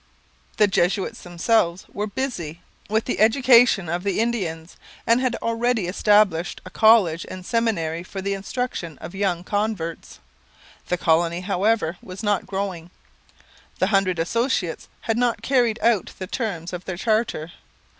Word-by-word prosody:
The 210 - +6
Jesuits 195 +4 0
themselves 175 0 0
were 210 +1 -2
busy 195 - -4 0.3
with 220 +1 +1
the - - -2
education 235 -4 +5
of 175 +2 -2
the 200 0 -1
Indians 180 -8 -2 0.3
and 235 +2 +3
had 255 -1 0
already 230 -2 0
established 190 -2 +2
a 185 - -9
college 210 -8 +4
and 185 -1 -8
seminary 185 -9 0
for 190 +2 -8
the 200 +1 -2
instruction 195 - -4
of 170 - -9
young 190 -3 -1
converts. 205 -5 -3 0.7
The 180 - 0
colony, 170 +1 +2
however, 195 -2 0
was 185 +3 -9
not 205 -2 0
growing. 190 -4 -4 0.9
The 190 +3 0
Hundred 190 -2 +2
Associates 185 +1 -1
had 225 0 -1
not 245 -2 0
carried 245 -5 +2
out 230 -4 +2
the 190 - -5
terms 185 -6 -4
of 180 0 -6
their 185 -2 -4
charter. 215 -6 0
195 Hz, 145 wpm, -23 LUFS, 175-225 Hz, 0.9 s, The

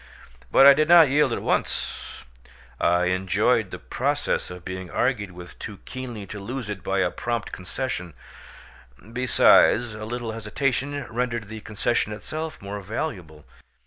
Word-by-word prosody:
But 135 - +6
I 140 - +11
did 155 +2 +2
not 170 -4 +8
yield 145 -1 +3
at - - -2
once; - - -2 0.6
I 90 +1 +3
enjoyed 90 +1 +1
the - - -6
process - - -1
of 90 -1 -10
being 95 -1 -6
argued 120 -3 0
with 90 0 -12
too 105 -2 -7
keenly 120 -5 -6
to 105 - -8
lose 115 +1 -5
it 100 - -6
by 95 0 0
a 90 -2 +1
prompt 120 +3 -3
concession; 90 - -5 1.0
besides, 120 -1 +4
a 110 0 -7
little 120 0 -4
hesitation 135 +6 -2
rendered 120 -2 -2
the 110 0 -7
concession 105 +1 -1
itself 155 +6 -6
more 100 +1 -5
valuable. 95 - -5
110 Hz, 145 wpm, -24 LUFS, 95-130 Hz, 1.0 s, I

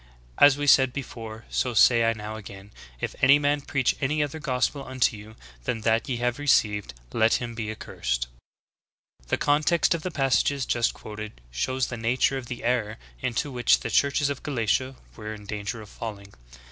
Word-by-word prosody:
As 145 -1 +7
we 145 - -2
said 130 -2 +5
before, 115 -5 -7
so 125 -2 0
say 115 +1 +6
I 115 - +3
now 110 0 -7
again, 100 -1 -10 0.3
If - - -3
any 135 +2 +7
man 145 0 +1
preach 135 -2 0
any 150 +3 +1
other 145 +2 -5
gospel 140 -1 -1
unto 130 -4 +1
you 105 +1 -12 0.3
than 115 - -2
that 115 +3 +1
ye 125 - -1
have 120 +2 -1
received, 105 - +2 0.2
let 110 +1 +3
him 120 -1 -3
be 110 -2 -4
accursed. 65 - -3
"'^ - - -7 1.0
5. - - -27
The - - +1
context 155 +4 +2
of 170 - -3
the 185 - -3
passages 135 -2 +1
just 120 -1 +1
quoted 105 - -8
shows 130 - -1
the 120 - -5
nature 125 +4 +1
of 125 - -10
the 120 0 -6
error 115 -3 0 0.2
into 130 +4 -1
which 125 -1 +3
"the 115 - -4
churches 140 +3 +2
of 140 - -5
Galatia" 130 0 0 0.2
were 110 -1 -6
in 105 -1 -12
danger 105 +2 -5
of 105 - -14
falling. 100 -3 -8
120 Hz, 190 wpm, -26 LUFS, 110-135 Hz, 1.0 s, As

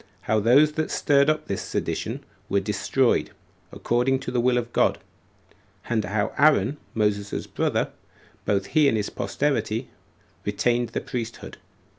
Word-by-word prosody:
How 110 - +1
Those 135 +8 +5
That 155 +1 -2
Stirred 140 0 +3
Up 155 0 0
This 100 - -2
Sedition - - -3 0.3
Were 100 - +2
Destroyed, 105 +6 +1 0.4
According 125 +3 +1
To 130 - -5
The 125 - 0
Will 125 0 +3
Of 120 -1 -3
God; - - +3 0.9
And 110 -2 0
How 105 +2 -1
Aaron, 150 0 +4 0.2
Moses's 105 -2 -1
Brother - - -1 0.5
Both 100 -2 0
He 155 -3 +5
And 115 - +2
His 105 - -2
Posterity, - - -1 0.5
Retained 120 +3 0
The - - -3
Priesthood. 115 -2 -6
120 Hz, 140 wpm, -25 LUFS, 105-135 Hz, 0.9 s, Those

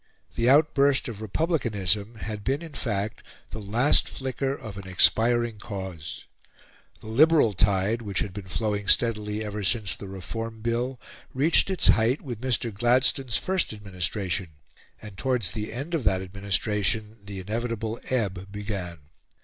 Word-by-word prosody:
The 120 +1 +3
outburst 140 -1 +4
of 110 -3 -6
republicanism 110 - 0
had 110 -2 -6
been 135 +7 -1
in 160 -3 -9
fact 105 -5 -2 0.3
the 110 - -5
last 115 +8 +3
flicker 135 0 -2
of 110 -7 -6
an 100 -1 -8
expiring 115 +4 +3
cause. 95 -7 -6 0.8
The - - -14
liberal 145 0 +5
tide, 100 +4 +2
which 100 -4 -4
had 100 - -1
been 100 -1 -7
flowing 105 +1 -1
steadily 105 -2 +2
ever 105 0 -4
since 100 -2 +1
the 100 - -9
Reform 110 +4 -6
Bill, 120 +3 -1 0.4
reached 150 +8 +4
its 190 - +3
height 115 +5 +4
with 120 -5 -7
Mr. 120 -3 0
Gladstone's 125 +2 +2
first 190 -9 0
administration; 95 -2 -2 0.5
and 105 -3 -11
towards 125 -9 0
the 105 -1 -4
end 140 +9 -5
of 160 -6 0
that 95 -2 +2
administration 105 +2 -1
the 100 -1 -7
inevitable 115 +3 -3
ebb 100 -6 -1
began. 100 -5 -5
110 Hz, 145 wpm, -26 LUFS, 100-120 Hz, 0.8 s, liberal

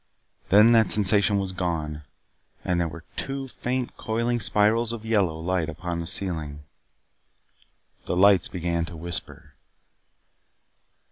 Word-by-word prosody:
Then 105 +5 +6
that 115 -2 +4
sensation 100 0 +3
was 95 -1 -2
gone, 80 -5 -3 0.6
and 90 -1 +1
there 85 - 0
were 80 +1 -10
two 135 0 -4
faint 125 0 -4
coiling 115 +2 -1
spirals 110 +2 +2
of 115 -1 -7
yellow 100 -8 +1
light 85 -1 -1
upon 85 +1 -5
the 85 - -5
ceiling. 80 -6 -2 1.4
The - - -2
lights 95 -2 +5
began 85 -2 -2
to 85 0 -10
whisper. 85 +1 -5
95 Hz, 125 wpm, -25 LUFS, 85-110 Hz, 1.4 s, Then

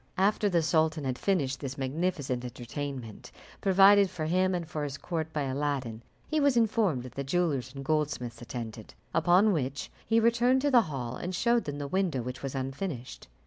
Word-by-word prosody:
After 205 +2 +2
the 170 -3 +2
sultan 155 -1 +2
had 130 -2 -2
finished 140 -9 0
this 135 -1 -5
magnificent 140 -2 -2
entertainment, 125 -1 -6 0.3
provided 195 +1 +6
for 155 -3 -4
him 185 +3 +2
and 170 -2 -3
for 155 -2 -4
his 140 -1 -4
court 160 -1 -4
by 150 -2 -1
Aladdin, 135 -4 -2 0.3
he 310 - 0
was 280 -4 +3
informed 215 - +2
that 125 -2 -10
the 140 - -4
jewellers 140 -4 0
and 135 0 -7
goldsmiths 140 -6 -1
attended; 115 -3 -7 0.2
upon 180 +6 +4
which 140 -3 -3
he 225 0 +3
returned 235 +3 +3
to 290 - +2
the 245 -3 +7
hall, 130 -4 -4
and 180 +1 -4
showed 235 +4 +2
them 145 -1 -4
the 145 -1 -4
window 175 -7 0
which 125 +2 -6
was 135 0 -4
unfinished. 135 0 -5
150 Hz, 185 wpm, -29 LUFS, 130-185 Hz, 0.3 s, the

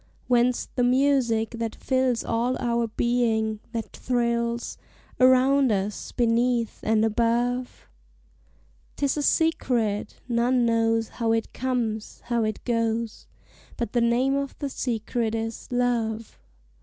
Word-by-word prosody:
Whence 245 0 +2
the 245 - +1
music 250 -3 +2
that 230 -1 -4
fills 260 -3 0
all 235 +3 0
our 235 -1 0
being 220 -2 0
that 230 -2 -5
thrills 235 -1 -1 0.4
Around 260 +1 +5
us, 200 0 -2
beneath, 235 0 +1
and 220 0 +2
above? 240 +3 0 1.1
'Tis 280 0 0
a - - 0
secret: 245 -11 +1
none 240 +1 +2
knows 225 -1 +1
how 230 -2 0
it 225 0 -2
comes, 235 -4 -2
how 235 -1 0
it 215 -1 -3
goes 230 -1 -1 0.5
But 235 -3 -3
the 240 - +2
name 240 +3 +2
of 280 -1 -3
the 285 - -3
secret 230 -2 -2
is 225 0 -4
Love! 235 -3 -1
235 Hz, 120 wpm, -25 LUFS, 225-250 Hz, 1.1 s, Around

